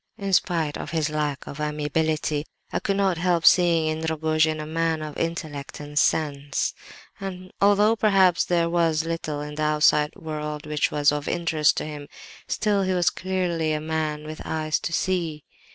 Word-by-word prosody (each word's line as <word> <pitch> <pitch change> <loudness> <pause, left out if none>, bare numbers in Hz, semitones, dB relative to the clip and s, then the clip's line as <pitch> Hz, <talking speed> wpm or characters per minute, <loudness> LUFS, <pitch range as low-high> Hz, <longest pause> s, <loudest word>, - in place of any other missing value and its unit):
"In 195 -1 -3
spite 165 -5 +1
of - - -6
his 155 -2 -1
lack 150 -2 -2
of 145 - -8
amiability, 150 0 -1 0.3
I - - +1
could 195 - -1
not 190 -4 +1
help 175 -1 +1
seeing, 170 -3 +5
in 155 0 -1
Rogojin 155 0 +1
a 155 - -4
man 160 0 -1
of 150 -1 -7
intellect 155 -5 -4
and 150 0 -2
sense; 145 -3 0 0.5
and 185 -1 -7
although, 205 +2 +5
perhaps, 195 -5 +4
there 170 -1 +1
was 165 -2 +1
little 160 -3 -3
in 150 0 -6
the 150 - -5
outside 150 0 +3
world 150 -1 -5
which 150 -1 0
was 145 -1 +3
of 150 0 -3
interest 160 -3 +2
to - - -2
him, 150 -2 -7 0.4
still 205 -2 +1
he 190 -1 0
was 175 -2 +2
clearly 175 -4 -1
a 155 - -1
man 155 -1 -2
with 155 0 -7
eyes 155 -1 -1
to - - -4
see. 165 -3 -1
160 Hz, 175 wpm, -24 LUFS, 150-175 Hz, 0.5 s, seeing